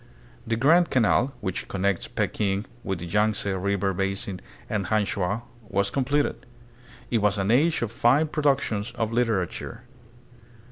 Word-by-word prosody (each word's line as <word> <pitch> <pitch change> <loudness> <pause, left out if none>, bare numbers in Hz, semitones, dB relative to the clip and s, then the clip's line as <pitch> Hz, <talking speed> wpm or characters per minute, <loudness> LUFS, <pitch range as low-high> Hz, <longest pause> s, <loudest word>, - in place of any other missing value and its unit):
The 115 - +1
Grand 165 +9 +4
Canal, 125 +2 +2
which 95 -3 -3
connects 100 -1 -1
Peking 100 0 -1 0.2
with 95 -2 -2
the 85 - -6
Yangtze 105 +4 +1
River 95 +1 0
basin 95 0 -2 0.3
and 100 -4 -2
Hangchau, 100 +1 0 0.3
was 100 +1 +1
completed. 140 0 0 0.6
It 115 - +3
was 105 -1 +2
an 100 +2 +1
age 150 +4 +3
of 115 - -2
fine 125 +6 +3
productions 135 -8 0
of 115 -1 -2
literature. 115 -7 -1
105 Hz, 135 wpm, -25 LUFS, 95-125 Hz, 0.6 s, Grand